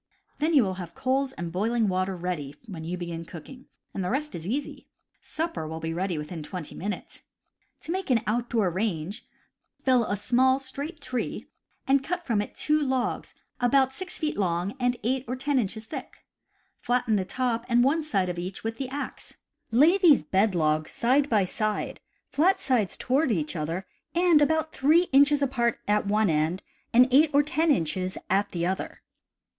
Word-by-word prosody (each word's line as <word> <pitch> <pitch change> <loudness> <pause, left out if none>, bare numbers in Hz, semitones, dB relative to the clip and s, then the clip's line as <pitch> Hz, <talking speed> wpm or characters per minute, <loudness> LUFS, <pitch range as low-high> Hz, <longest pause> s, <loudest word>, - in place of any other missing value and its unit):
P - - -42 0.3
Then 330 - +2
you 270 - +7
will 190 -2 -1
have 170 -2 -9
coals 265 +1 0
and 170 -6 -5
boiling 220 +5 +1
water 185 0 0
ready 170 -6 -4
when 180 -8 -7
you 175 +3 -3
begin 170 -1 -5
cooking, 250 +11 -11 0.3
and 195 - -3
the 180 - -1
rest 300 +5 -2
is 165 +1 -6
easy 275 +7 -4 0.2
— - - -46 0.2
supper 320 - -2
will 160 +1 -5
be 165 0 -3
ready 180 0 -2
within 150 +2 -5
twenty 160 +1 -7
minutes. 205 +3 -6 0.6
To - - -6
make 380 -2 -3
an 240 -4 +3
outdoor 225 -3 0
range: 190 +1 -3 0.6
fell 255 -2 +4
a 205 - -1
small, 260 +5 +3
straight 280 +4 -7
tree, 255 -3 -3 0.4
and 270 0 +3
cut 350 +3 -3
from 220 -4 +1
it 205 - -7
two 305 0 +1
logs, 260 -3 -1 0.2
about 265 +2 +3
6 360 +5 -4
feet 305 -8 -2
long 180 +1 0
and 245 -1 +1
8 255 +3 0
or 250 - -2
10 275 +1 0
inches 220 0 -3
thick. - - -9 0.5
Flatten 245 -2 +1
the 195 - +1
top 235 +4 -1
and 240 0 +4
one 295 +5 +2
side 200 -12 0
of 175 -1 -3
each 185 +2 -5
with 225 0 -4
the 265 -2 -3
axe. 280 +2 -6 0.3
Lay 305 - +5
these 320 - +6
bed 190 +5 +2
logs 155 -1 +1
side 270 +4 +2
by 210 -4 +3
side, 215 +3 -2 0.3
flat 365 +7 +2
sides 250 - 0
toward 270 +1 +1
each 160 -5 -1
other, 165 +4 -3 0.3
and 345 -3 +5
about 315 +1 +1
3 310 +6 +4
inches 285 +1 +5
apart 240 -3 +1
at 210 0 +2
one 210 -2 +2
end 155 +4 0 0.3
and 250 +2 +6
8 295 +4 +6
or 290 - +6
10 315 +2 0
inches 185 - 0
at 200 +2 +2
the 170 -1 -2
other. 190 +2 -3
235 Hz, 185 wpm, -27 LUFS, 185-275 Hz, 0.6 s, you